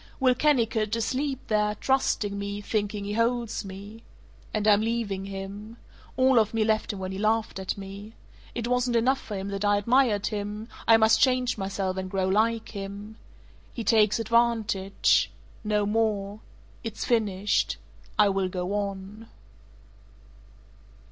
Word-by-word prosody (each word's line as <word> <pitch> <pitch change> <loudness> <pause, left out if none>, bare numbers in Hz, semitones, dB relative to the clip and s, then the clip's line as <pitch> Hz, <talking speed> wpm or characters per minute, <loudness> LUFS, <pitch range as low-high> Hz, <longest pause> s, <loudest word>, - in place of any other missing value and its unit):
"Will 260 -2 +4
Kennicott, 230 -6 +1
asleep 265 +4 -1
there, 210 -1 +1
trusting 210 -7 0
me, 200 0 -4
thinking 205 -1 -2
he 205 - -3
holds 230 0 0
me. 200 +3 -9 0.5
And 215 0 -1
I'm 205 -1 +6
leaving 220 -4 -2
him. 200 +3 -7 0.4
All 260 -1 +5
of 220 0 0
me 225 - +2
left 215 0 +1
him 205 - -7
when 190 0 -4
he 190 - -5
laughed 215 -1 0
at 190 +1 -3
me. 200 +2 -9 0.4
It 235 -1 -2
wasn't 250 0 +1
enough 255 +4 +2
for 210 - -6
him 195 +1 -4
that 200 0 -3
I 205 0 +3
admired 230 -1 +2
him; 210 +2 -4 0.2
I 225 - +8
must 220 0 +4
change 255 -2 +3
myself 190 -1 -3
and 185 0 -3
grow 190 -1 0
like 220 +3 +1
him. 200 +1 -7 0.6
He 235 - -3
takes 215 -2 +4
advantage. 225 -4 +2 0.3
No 210 -1 +1
more. 210 -1 0 0.4
It's 225 -2 -4
finished. 210 -4 +1 0.4
I 210 -1 +5
will 195 -1 0
go 180 +1 -3
on." 200 +2 -4
210 Hz, 150 wpm, -27 LUFS, 200-230 Hz, 0.6 s, I